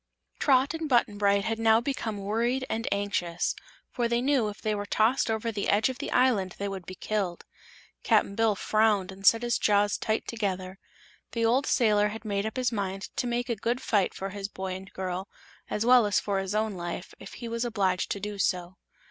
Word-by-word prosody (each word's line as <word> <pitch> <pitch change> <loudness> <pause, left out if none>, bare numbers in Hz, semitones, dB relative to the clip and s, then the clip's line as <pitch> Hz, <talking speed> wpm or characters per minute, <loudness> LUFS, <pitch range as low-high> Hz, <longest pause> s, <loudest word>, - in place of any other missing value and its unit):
Trot 270 +1 +3
and 325 -1 -4
Button 230 -5 +2
Bright 200 -1 +3
had 225 0 -1
now 225 0 +5
become 235 -4 -3
worried 230 +6 -1
and 225 +1 -2
anxious, 200 -4 -1 0.4
for 240 -1 0
they 235 0 +1
knew 255 -4 +2
if 205 - -9
they 215 - -1
were 205 -1 -3
tossed 225 +5 +2
over 225 +1 -1
the 205 -2 -2
edge 210 +5 +3
of 260 - -6
the - - -4
island 220 -8 +2
they 200 - -3
would 190 -3 -6
be 185 - -7
killed. 195 -4 -3 0.6
Cap'n - - +2
Bill 225 0 +2
frowned 210 -2 +2
and 195 +1 -3
set 230 +1 +6
his 240 -1 +1
jaws 205 0 +2
tight 220 0 -1
together. 190 -4 -3 0.5
The 230 -1 +1
old 255 +5 +2
sailor 210 -4 +3
had 220 +1 -7
made 200 0 -1
up 220 - -6
his 250 -2 +1
mind 195 -3 -4
to 245 - 0
make 240 0 -1
a 235 - -1
good 235 +4 -1
fight 205 -7 +1
for 195 - -4
his 200 0 -4
boy 190 -2 -5
and 190 +1 -8
girl, 185 +1 -4 0.4
as 210 - -1
well 245 -3 +6
as 205 - +2
for 200 -2 -1
his 195 +1 -3
own 215 0 0
life, 175 -1 -6
if - - -10
he 235 - -7
was 230 +1 -2
obliged 195 -6 0
to 200 - -2
do 205 0 -5
so. 180 -1 -1
210 Hz, 215 wpm, -28 LUFS, 195-235 Hz, 0.6 s, set